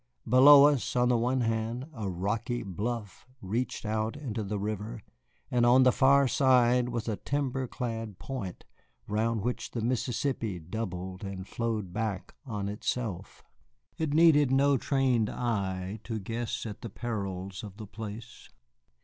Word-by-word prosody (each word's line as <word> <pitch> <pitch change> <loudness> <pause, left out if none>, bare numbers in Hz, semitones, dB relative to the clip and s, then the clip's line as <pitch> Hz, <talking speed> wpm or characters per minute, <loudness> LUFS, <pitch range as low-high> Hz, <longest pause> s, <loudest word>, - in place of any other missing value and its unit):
Below 140 +4 +9
us, 145 -4 +2
on 125 0 +3
the 125 - +4
one 125 +2 +1
hand, 115 +2 -1
a 110 -5 -4
rocky 105 +7 -2
bluff 105 +4 -5
reached 115 +3 -3
out 110 +4 -1
into 120 -7 -4
the 105 +1 -3
river, 105 +2 -4 0.5
and 120 -1 +2
on 125 +2 +6
the 130 - +6
far 140 +1 +5
side 125 -2 +4
was 120 -2 -3
a 110 -3 -1
timber 135 -2 -2
clad 115 -5 -4
point 120 -10 -6 0.4
round 110 +1 0
which 125 +1 -2
the 115 - -4
Mississippi 120 -3 -1
doubled 90 +1 -5
and 95 -1 -6
flowed 110 -6 -3
back 105 -3 -3
on 105 -4 -3
itself. 105 -2 -4 0.6
It 160 -2 0
needed 150 -3 +5
no 140 +2 +4
trained 130 -4 +1
eye 100 -4 -2
to 115 -2 -3
guess 115 +4 -4
at 105 -2 -7
the 115 - -6
perils 100 -5 -4
of 100 -2 -9
the 110 - -7
place. 110 +2 -9
115 Hz, 150 wpm, -29 LUFS, 105-125 Hz, 0.6 s, Below